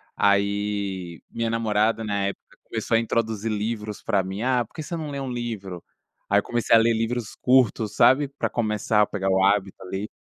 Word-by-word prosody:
Aí, 100 Hz, -4 st, 0 dB
minha 115 Hz, -1 st, -2 dB
namorada, 110 Hz, 0 st, +1 dB
na 100 Hz, -2 st, -1 dB
época, 100 Hz, -, -8 dB
começou 115 Hz, -, -2 dB
a -, -, +3 dB
introduzir 115 Hz, -1 st, -1 dB
livros 105 Hz, 0 st, -3 dB
pra 100 Hz, -4 st, +2 dB
mim. 95 Hz, +2 st, -5 dB
"Ah, 125 Hz, -1 st, +1 dB
por -, -, -28 dB
que 155 Hz, -, -6 dB
você 170 Hz, +2 st, -5 dB
não 155 Hz, -2 st, -5 dB
lê 140 Hz, -, -4 dB
um 135 Hz, -2 st, -4 dB
livro?". 105 Hz, -7 st, -5 dB, 0.5 s
Aí 100 Hz, -, +5 dB
eu -, -, -4 dB
comecei 120 Hz, -1 st, +2 dB
a 115 Hz, -, +8 dB
ler 115 Hz, +1 st, +3 dB
livros 115 Hz, 0 st, -2 dB
curtos, 115 Hz, -4 st, +2 dB
sabe, 140 Hz, +2 st, +5 dB
pra 140 Hz, +1 st, -3 dB
começar 105 Hz, -2 st, +1 dB
a -, -, +5 dB
pegar 95 Hz, -1 st, -2 dB
o 95 Hz, 0 st, +3 dB
hábito, 100 Hz, -1 st, +1 dB
ali. 95 Hz, +3 st, -4 dB
110 Hz, 200 wpm, -24 LUFS, 100-115 Hz, 0.5 s, a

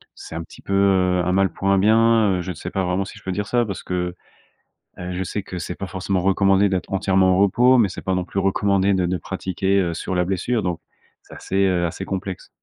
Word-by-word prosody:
c'est 80 Hz, -, -10 dB
un 85 Hz, -, -4 dB
petit -, -, -15 dB
peu, 100 Hz, -, -5 dB
heu, 95 Hz, -2 st, +3 dB
un 90 Hz, -, +1 dB
mal 95 Hz, -1 st, +3 dB
pour 95 Hz, -, -4 dB
un 100 Hz, -, +4 dB
bien, 110 Hz, -1 st, +4 dB
heu, -, -, -2 dB
je 90 Hz, 0 st, -5 dB
sais 85 Hz, +2 st, -7 dB
pas 95 Hz, -1 st, -1 dB
vraiment 90 Hz, +2 st, 0 dB
si 100 Hz, -, -11 dB
je -, -, -24 dB
peux 95 Hz, -, -3 dB
dire 105 Hz, +1 st, -2 dB
ça 120 Hz, +1 st, +1 dB
parce 100 Hz, -3 st, -6 dB
que, 90 Hz, -1 st, -3 dB, 0.8 s
heu, 90 Hz, 0 st, -5 dB
je 95 Hz, +1 st, -2 dB
sais 100 Hz, +2 st, -4 dB
que 90 Hz, -, -7 dB
c'est 90 Hz, -, -5 dB
pas 100 Hz, -, -6 dB
forcément 95 Hz, +1 st, -2 dB
recommandé 95 Hz, +1 st, +3 dB
d'être 95 Hz, -1 st, -3 dB
entièrement 95 Hz, -1 st, +2 dB
au -, -, +2 dB
repos, 125 Hz, +6 st, +4 dB
mais 110 Hz, -4 st, +4 dB
c'est -, -, -8 dB
pas 95 Hz, -1 st, -1 dB
non 90 Hz, -, -1 dB
plus 100 Hz, -, -3 dB
recommandé 100 Hz, 0 st, +2 dB
de 90 Hz, -2 st, +1 dB
de 90 Hz, +1 st, -1 dB
pratiquer, 95 Hz, +4 st, -1 dB
heu, 85 Hz, -3 st, 0 dB
sur 95 Hz, -, -4 dB
la 90 Hz, -, +1 dB
blessure. 105 Hz, +5 st, -1 dB
Donc 90 Hz, -2 st, -2 dB, 0.4 s
c'est -, -, -16 dB
assez, 95 Hz, -, -6 dB
heu, 90 Hz, -2 st, +1 dB
assez 85 Hz, +3 st, -4 dB
complexe. 95 Hz, -1 st, -5 dB
95 Hz, 250 wpm, -22 LUFS, 90-100 Hz, 0.8 s, un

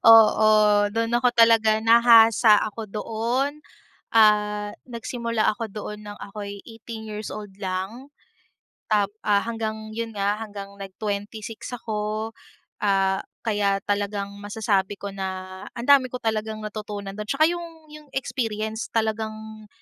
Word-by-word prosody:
Oo, 220 Hz, -1 st, +8 dB, 0.4 s
do'n 230 Hz, +2 st, -1 dB
ako 250 Hz, +1 st, +4 dB
talaga 225 Hz, -2 st, +5 dB
nahasa 225 Hz, -1 st, +6 dB
ako 215 Hz, 0 st, -6 dB
doon, 240 Hz, +7 st, -2 dB, 0.5 s
ah 210 Hz, -1 st, +4 dB, 0.2 s
nagsimula 235 Hz, -2 st, -3 dB
ako 230 Hz, +2 st, -4 dB
doon 210 Hz, 0 st, -7 dB
nang 205 Hz, -, -7 dB
ako'y 200 Hz, -1 st, -7 dB
18 225 Hz, 0 st, -9 dB
years 210 Hz, 0 st, -5 dB
old 210 Hz, -1 st, -7 dB
lang. 200 Hz, +8 st, -4 dB, 0.8 s
Tap 205 Hz, -2 st, +2 dB
ah 205 Hz, -1 st, +3 dB
hanggang 220 Hz, -1 st, -4 dB
yun 225 Hz, 0 st, -5 dB
nga, 205 Hz, +1 st, 0 dB
hanggang 205 Hz, -3 st, -7 dB
nag 195 Hz, -1 st, -8 dB
26 215 Hz, +3 st, -4 dB
ako, 215 Hz, -1 st, -3 dB, 0.5 s
ah 195 Hz, -1 st, +2 dB, 0.2 s
kaya 205 Hz, -3 st, +1 dB
talagang 200 Hz, 0 st, -2 dB
masasabi 205 Hz, -1 st, -1 dB
ko 200 Hz, -, -5 dB
na 190 Hz, -1 st, -6 dB
ang 235 Hz, +2 st, -5 dB
dami 275 Hz, -2 st, +6 dB
ko 250 Hz, -, -5 dB
talagang 220 Hz, -1 st, -2 dB
natutunan 210 Hz, -2 st, -5 dB
do'n. 210 Hz, 0 st, -5 dB
Tsaka 290 Hz, +7 st, +3 dB
yung 345 Hz, 0 st, -3 dB, 0.3 s
yung 300 Hz, -1 st, -12 dB
experience 220 Hz, -4 st, -2 dB
talagang 220 Hz, -1 st, -3 dB
215 Hz, 130 wpm, -24 LUFS, 205-230 Hz, 0.8 s, Oo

